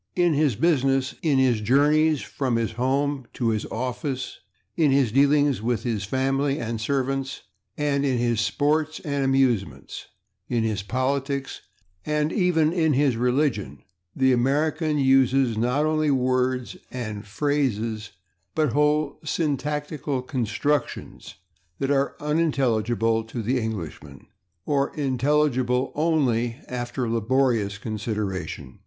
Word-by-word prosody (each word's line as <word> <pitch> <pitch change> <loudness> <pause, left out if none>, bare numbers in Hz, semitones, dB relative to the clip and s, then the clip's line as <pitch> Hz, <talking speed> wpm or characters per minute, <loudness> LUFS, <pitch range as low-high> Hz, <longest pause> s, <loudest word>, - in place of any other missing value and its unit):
In 175 -2 +3
his 145 -5 +2
business, 135 -1 +2
in 150 -5 +2
his 125 -4 +3
journeys 150 +6 +3
from 130 -4 -2
his 115 -1 0
home 135 +2 -1
to 120 -3 0
his 110 -2 -1
office, 130 +2 -4 0.4
in 160 -4 +3
his 135 -4 +3
dealings 140 0 +3
with 115 -1 -1
his 110 -5 -2
family 135 +4 0
and 115 -1 -3
servants, 135 +2 -2 0.3
in 145 -1 +1
his 120 -4 +1
sports 150 +6 0
and 140 -2 -2
amusements, 135 -6 0 0.4
in 120 -2 +1
his 110 -2 -1
politics 135 +4 -2 0.4
and 150 +3 0
even 170 -5 +2
in 160 -4 +2
his 135 -2 +2
religion 125 - 0 0.3
the 130 -1 +3
American 150 +5 +1
uses, 135 -2 +3
not 125 +7 +1
only 155 -1 +1
words 130 -1 0
and 110 -4 -6
phrases, 115 -4 -1 0.5
but 155 -6 +1
whole 150 0 +1
syntactical 150 -2 -2
constructions, 130 +3 -2 0.4
that 135 0 -1
are 140 0 +1
unintelligible 120 -8 +1
to 115 +1 -5
the 125 +4 +1
Englishman, 85 - -6 0.4
or 140 -1 +1
intelligible 130 -2 +1
only 130 -7 +1
after 125 0 -3
laborious 115 -3 +1
consideration. 105 -3 -4
130 Hz, 120 wpm, -24 LUFS, 115-145 Hz, 0.5 s, In